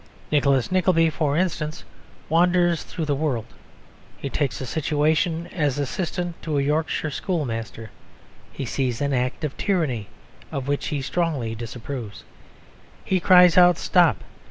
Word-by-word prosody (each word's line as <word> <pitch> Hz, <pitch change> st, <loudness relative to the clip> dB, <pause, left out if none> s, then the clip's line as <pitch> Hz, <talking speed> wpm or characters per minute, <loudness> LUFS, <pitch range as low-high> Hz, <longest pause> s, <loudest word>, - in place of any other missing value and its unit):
Nicholas 140 Hz, -3 st, +2 dB
Nickleby, 180 Hz, -3 st, +3 dB
for 150 Hz, -2 st, 0 dB
instance, 165 Hz, -3 st, -2 dB, 0.4 s
wanders 175 Hz, +1 st, +3 dB
through 165 Hz, -, -5 dB
the 145 Hz, -, 0 dB
world; 140 Hz, -6 st, -1 dB, 0.7 s
he 140 Hz, -, -5 dB
takes 140 Hz, -5 st, -1 dB
a 130 Hz, -, -4 dB
situation 155 Hz, +4 st, 0 dB
as 150 Hz, -7 st, 0 dB
assistant 175 Hz, +4 st, -3 dB
to 155 Hz, -3 st, -2 dB
a -, -, +2 dB
Yorkshire 155 Hz, +1 st, -1 dB
schoolmaster; 115 Hz, -, -4 dB, 0.6 s
he 140 Hz, -, -5 dB
sees 125 Hz, -1 st, -2 dB
an 140 Hz, -1 st, 0 dB
act 125 Hz, +2 st, -1 dB
of 150 Hz, -3 st, -3 dB
tyranny 145 Hz, -, -1 dB, 0.4 s
of 135 Hz, -1 st, -4 dB
which 145 Hz, 0 st, -1 dB
he 145 Hz, -2 st, -2 dB
strongly 140 Hz, -7 st, -1 dB
disapproves; 115 Hz, -1 st, -7 dB, 0.8 s
he 190 Hz, -, +1 dB
cries 180 Hz, -1 st, +6 dB
out 175 Hz, -1 st, +6 dB
"Stop!" 170 Hz, -, +3 dB
150 Hz, 135 wpm, -23 LUFS, 135-170 Hz, 0.8 s, cries